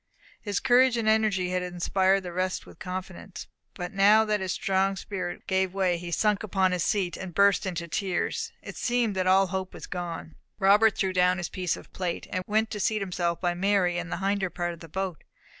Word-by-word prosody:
His 205 Hz, -2 st, -1 dB
courage 255 Hz, -1 st, +4 dB
and 225 Hz, -1 st, -1 dB
energy 215 Hz, -5 st, +2 dB
had 185 Hz, 0 st, 0 dB
inspired 185 Hz, +2 st, +1 dB
the 175 Hz, -1 st, -6 dB
rest 185 Hz, +1 st, -2 dB
with -, -, -15 dB
confidence. 185 Hz, +1 st, -7 dB, 0.3 s
But 175 Hz, 0 st, -5 dB
now 205 Hz, +3 st, +5 dB
that 210 Hz, -1 st, +1 dB
his 190 Hz, -1 st, -2 dB
strong 195 Hz, 0 st, +1 dB
spirit 190 Hz, -2 st, -5 dB
gave 190 Hz, 0 st, 0 dB
way, 190 Hz, -2 st, +2 dB
and 175 Hz, -, -1 dB
he 175 Hz, -, -6 dB
sunk 210 Hz, +3 st, +1 dB
upon 190 Hz, -3 st, +1 dB
his 180 Hz, -3 st, 0 dB
seat, 190 Hz, -4 st, 0 dB
and 185 Hz, -3 st, -7 dB
burst 200 Hz, -1 st, +4 dB
into 170 Hz, -2 st, -3 dB
tears, 200 Hz, -, -2 dB
it -, -, -8 dB
seemed 240 Hz, -4 st, 0 dB
that 185 Hz, -1 st, 0 dB
all 190 Hz, +1 st, +5 dB
hope 190 Hz, 0 st, -4 dB
was -, -, -8 dB
gone. 170 Hz, -3 st, -5 dB, 0.2 s
Robert 205 Hz, +2 st, +5 dB
threw 190 Hz, -1 st, 0 dB
down 180 Hz, 0 st, +3 dB
his 175 Hz, -, -4 dB
piece 180 Hz, -2 st, -2 dB
of -, -, -14 dB
plate, 180 Hz, -2 st, -3 dB
and 185 Hz, -, -2 dB
went 220 Hz, +1 st, +1 dB
to 210 Hz, -, -4 dB
seat 215 Hz, 0 st, 0 dB
himself 175 Hz, -2 st, -1 dB
by 175 Hz, -1 st, 0 dB
Mary, 180 Hz, -1 st, +1 dB
in 175 Hz, -1 st, -5 dB
the -, -, -3 dB
hinder 195 Hz, 0 st, 0 dB
part 175 Hz, -1 st, -3 dB
of 170 Hz, -, -12 dB
the 165 Hz, -, -11 dB
boat. 190 Hz, 0 st, -4 dB
190 Hz, 215 wpm, -27 LUFS, 180-200 Hz, 0.3 s, now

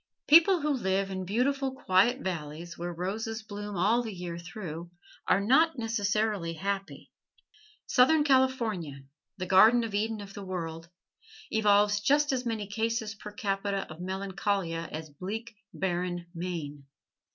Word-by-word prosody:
People 335 Hz, +3 st, +7 dB
who 300 Hz, +1 st, +1 dB
live 195 Hz, -5 st, 0 dB
in 190 Hz, -1 st, -4 dB
beautiful, 265 Hz, +6 st, 0 dB
quiet 240 Hz, +5 st, +3 dB
valleys, 165 Hz, -, -5 dB
where 175 Hz, +1 st, -4 dB
roses 215 Hz, +6 st, -4 dB
bloom 205 Hz, -1 st, -6 dB
all 215 Hz, +7 st, +3 dB
the 225 Hz, -2 st, -5 dB
year 175 Hz, -3 st, -6 dB
through, 170 Hz, -1 st, -7 dB, 0.4 s
are -, -, +4 dB
not 270 Hz, +10 st, +4 dB
necessarily 210 Hz, -5 st, 0 dB
happy. 195 Hz, +3 st, -4 dB, 0.7 s
Southern 295 Hz, +5 st, +4 dB
California 230 Hz, -, +1 dB, 0.3 s
the 185 Hz, -, -3 dB
Garden 215 Hz, +6 st, +6 dB
of 225 Hz, -2 st, -4 dB
Eden 220 Hz, +2 st, -1 dB
of 200 Hz, -1 st, -9 dB
the 200 Hz, -, -7 dB
world 165 Hz, -3 st, -5 dB, 0.6 s
evolves 205 Hz, -1 st, +4 dB
just 290 Hz, +7 st, +3 dB
as 250 Hz, -1 st, -2 dB
many 220 Hz, -3 st, -2 dB
cases 220 Hz, +1 st, -2 dB
per 210 Hz, 0 st, -10 dB
capita 200 Hz, -3 st, -2 dB
of 160 Hz, +2 st, -9 dB
melancholia 190 Hz, -2 st, -2 dB
as 155 Hz, 0 st, -6 dB
bleak, 210 Hz, +9 st, -6 dB, 0.2 s
barren 175 Hz, -1 st, -2 dB
Maine. 160 Hz, -5 st, -5 dB
200 Hz, 140 wpm, -29 LUFS, 175-225 Hz, 0.7 s, People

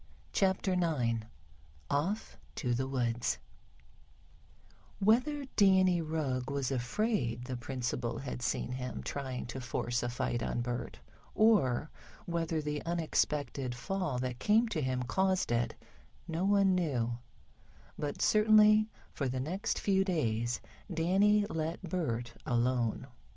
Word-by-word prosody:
CHAPTER 190 Hz, 0 st, +2 dB
IX 125 Hz, -11 st, 0 dB, 0.6 s
OFF 180 Hz, +10 st, -1 dB, 0.2 s
TO 125 Hz, -5 st, -1 dB
THE 130 Hz, +2 st, -1 dB
WOODS 120 Hz, -3 st, 0 dB, 1.6 s
WHETHER 250 Hz, +8 st, +2 dB
Danny 190 Hz, -3 st, +5 dB
Rugg 145 Hz, -6 st, -2 dB
was 140 Hz, -2 st, -1 dB
afraid 125 Hz, -, -1 dB
the 130 Hz, 0 st, -4 dB
principal 120 Hz, -1 st, -3 dB
had 125 Hz, -2 st, -5 dB
seen 125 Hz, 0 st, -1 dB
him 125 Hz, 0 st, -4 dB
trying 130 Hz, -3 st, -4 dB
to 125 Hz, +2 st, -6 dB
force 120 Hz, 0 st, -1 dB
a 120 Hz, -, -1 dB
fight 120 Hz, -1 st, -2 dB
on 120 Hz, -, -1 dB
Bert, 120 Hz, 0 st, -4 dB, 0.4 s
or 160 Hz, -, +3 dB, 0.3 s
whether 165 Hz, -2 st, -1 dB
the 150 Hz, 0 st, -3 dB
unexpected 145 Hz, -6 st, -1 dB
fall 180 Hz, 0 st, -2 dB
that 125 Hz, -1 st, -3 dB
came 220 Hz, -, +4 dB
to 165 Hz, -7 st, -1 dB
him, 130 Hz, -2 st, -1 dB
caused 190 Hz, +4 st, +1 dB
it, 120 Hz, 0 st, 0 dB, 0.5 s
no 170 Hz, +2 st, -1 dB
one 200 Hz, -1 st, +4 dB
knew, 125 Hz, -10 st, 0 dB, 0.8 s
but 145 Hz, -1 st, -3 dB
certainly, 215 Hz, 0 st, +6 dB, 0.2 s
for 135 Hz, -3 st, -1 dB
the 130 Hz, +1 st, -2 dB
next 175 Hz, +10 st, -2 dB
few 195 Hz, -1 st, +2 dB
days, 120 Hz, -, 0 dB, 0.3 s
Danny 195 Hz, +5 st, +3 dB
let 160 Hz, -1 st, -3 dB
Bert 120 Hz, -10 st, -2 dB
alone. 120 Hz, -1 st, 0 dB
145 Hz, 125 wpm, -32 LUFS, 125-190 Hz, 1.6 s, certainly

